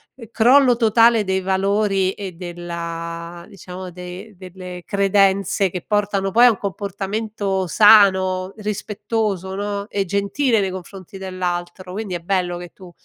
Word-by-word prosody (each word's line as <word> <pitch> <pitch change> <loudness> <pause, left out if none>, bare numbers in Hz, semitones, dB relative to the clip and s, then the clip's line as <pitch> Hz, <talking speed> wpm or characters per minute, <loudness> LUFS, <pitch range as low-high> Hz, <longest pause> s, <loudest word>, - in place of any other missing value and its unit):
ehm, 235 -3 -12
crollo 250 +2 +5
totale 230 0 +4
dei 190 -1 -1
valori 195 0 +1
e 195 -2 -7
della 170 -1 -6
diciamo 185 -1 -9
dei 180 +4 -9
delle 180 -1 -9
credenze 195 0 +2
che 180 0 -5
portano 200 -2 0
poi 235 +5 +6
a - - +8
un 220 - 0
comportamento 200 0 -3
sano, 190 -2 +5
rispettoso, 210 -2 -3
no, 200 0 -3
e 200 -3 -1
gentile 205 +6 0
nei 190 -1 -1
confronti 185 +1 -9
dell'altro, 185 -1 -4
quindi 200 -2 -4
è - - -3
bello 175 0 -1
che 175 0 -9
tu 185 -2 -14
195 Hz, 140 wpm, -20 LUFS, 180-205 Hz, -, a